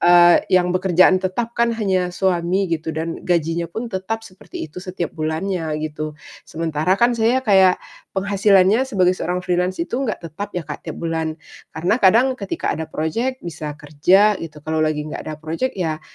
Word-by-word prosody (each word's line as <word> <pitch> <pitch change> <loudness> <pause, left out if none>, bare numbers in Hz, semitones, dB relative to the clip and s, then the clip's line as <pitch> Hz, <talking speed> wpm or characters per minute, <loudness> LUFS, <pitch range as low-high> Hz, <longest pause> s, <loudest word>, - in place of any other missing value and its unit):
eee, 175 0 +7
yang 180 -1 +3
bekerjaan 185 0 +4
tetap 225 +6 -2
kan 235 0 +2
hanya 190 -5 0
suami 185 0 +1
gitu 160 0 -2
dan 165 +1 -3
gajinya 170 -1 0
pun 225 +8 -5
tetap 220 +4 -3
seperti 185 -2 -9
itu 160 +3 -9
setiap 180 -3 -4
bulannya, 160 0 -2
gitu. 155 0 -5 0.3
Sementara 160 +3 0
kan 240 +2 +3
saya 235 +3 +1
kayak 190 -4 +5 0.4
penghasilannya 200 +4 +3
sebagai 185 -6 +3
seorang 180 0 -2
freelance 180 +1 0
itu 195 +10 -2
gak 220 -5 -2
tetap 165 +6 -6
ya 175 - -2
Kak, 150 - -6
tiap - - -5
bulan 160 -1 -2 0.4
karena 175 +6 +1
kadang 220 +6 +5
ketika 200 - -4
ada 160 +1 -5
projek 230 +12 -2
bisa 150 -3 -6
kerja 180 +9 +3
gitu, 155 -2 -8
kalo 160 0 -1
lagi 155 -1 0
gak - - -5
ada 155 - -4
projek 165 +12 -3
ya 160 -4 -2
180 Hz, 170 wpm, -20 LUFS, 160-195 Hz, 0.4 s, eee